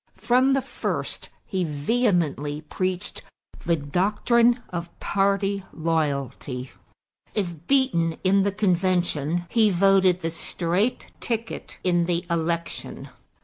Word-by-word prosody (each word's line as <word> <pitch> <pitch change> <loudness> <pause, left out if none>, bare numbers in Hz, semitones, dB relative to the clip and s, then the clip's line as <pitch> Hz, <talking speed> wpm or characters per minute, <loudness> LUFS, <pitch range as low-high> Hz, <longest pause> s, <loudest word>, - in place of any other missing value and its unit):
From 255 +2 +3
the 270 -1 +1
first - - -4 0.2
he 190 -3 -1
vehemently 155 - 0
preached 185 +4 -3 0.5
the 170 - +4
doctrine 210 - +2
of 170 -1 -4
party 195 0 +1
loyalty; 140 -5 -2 0.6
if 175 -5 -3
beaten 255 -13 +2
in 195 +1 +4
the 200 +1 +1
convention, 175 -4 +1
he 220 0 +4
voted 190 -1 +4
the 165 - -2
straight 175 +7 -1
ticket 230 -1 -4
in 175 -2 +2
the 175 -1 0
election. 170 0 -3
180 Hz, 105 wpm, -25 LUFS, 165-200 Hz, 0.6 s, the